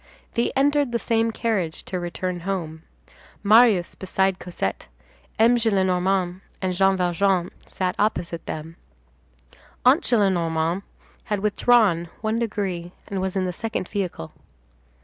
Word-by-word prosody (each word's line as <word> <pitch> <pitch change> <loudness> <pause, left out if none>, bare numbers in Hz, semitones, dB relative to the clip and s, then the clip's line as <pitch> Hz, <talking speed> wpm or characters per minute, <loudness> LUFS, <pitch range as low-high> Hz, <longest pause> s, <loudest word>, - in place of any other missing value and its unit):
They 235 - +1
entered 285 -1 +2
the 235 - +1
same 230 -1 +1
carriage 215 -8 -2
to 185 - -4
return 175 +1 -3
home, 170 -4 -4 0.6
Marius 215 -4 +5
beside 190 0 0
Cosette; 180 - -4 0.5
M. 235 +2 +5
Gillenormand 190 -4 +1 0.2
and 185 -1 -1
Jean 195 +1 +3
Valjean 180 0 +1 0.2
sat 185 -1 -2
opposite 170 -5 -1
them; 160 +2 -6 1.1
Aunt 270 +7 +6
Gillenormand 175 -5 +1 0.4
had 210 -4 -2
withdrawn 210 -5 +3
one 220 +1 0
degree, 190 -6 -3 0.2
and 195 -2 -2
was 190 0 -2
in 190 -1 +1
the 180 - -2
second 220 -1 -3
vehicle. 185 - -4
190 Hz, 125 wpm, -23 LUFS, 175-220 Hz, 1.1 s, Aunt